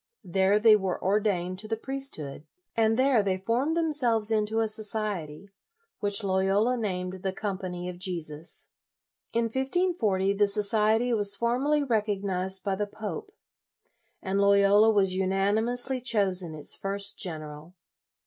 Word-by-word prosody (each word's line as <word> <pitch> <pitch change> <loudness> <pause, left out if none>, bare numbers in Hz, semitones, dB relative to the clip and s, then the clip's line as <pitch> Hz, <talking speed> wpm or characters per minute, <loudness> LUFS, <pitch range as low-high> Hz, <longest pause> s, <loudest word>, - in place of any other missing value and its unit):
There 190 +3 +2
they 215 0 +6
were 190 -3 -2
ordained 190 -2 0
to 215 - -8
the 225 0 -2
priesthood. 220 - -6 0.3
And 225 0 +2
there 260 -3 +4
they 190 -2 -1
formed 245 - 0
themselves 245 -10 +1
into 215 0 +1
a 225 - +1
society, 205 -5 -4 0.5
which 205 +1 +1
Loyola 195 +5 +2
named 185 -5 -4
the 190 - -1
Com 195 -1 -4
pany 180 -2 -5
of 180 -1 -7
Jesus. 165 -4 -3 0.6
In 235 +1 +1
1540, 245 - 0
the 205 +1 +2
society 215 +3 +1
was 205 -2 +5
formally 270 +6 +1
recognized 200 -5 -1
by 200 - -1
the 205 +2 -2
pope, 220 - -7 0.9
and 195 +1 0
Loyola 200 +2 +5
was 195 -4 +3
unanimously 215 +7 0
chosen 190 -8 +1
its 150 - -2
first 200 0 -2
general. 155 -1 -6
205 Hz, 135 wpm, -27 LUFS, 190-225 Hz, 0.9 s, they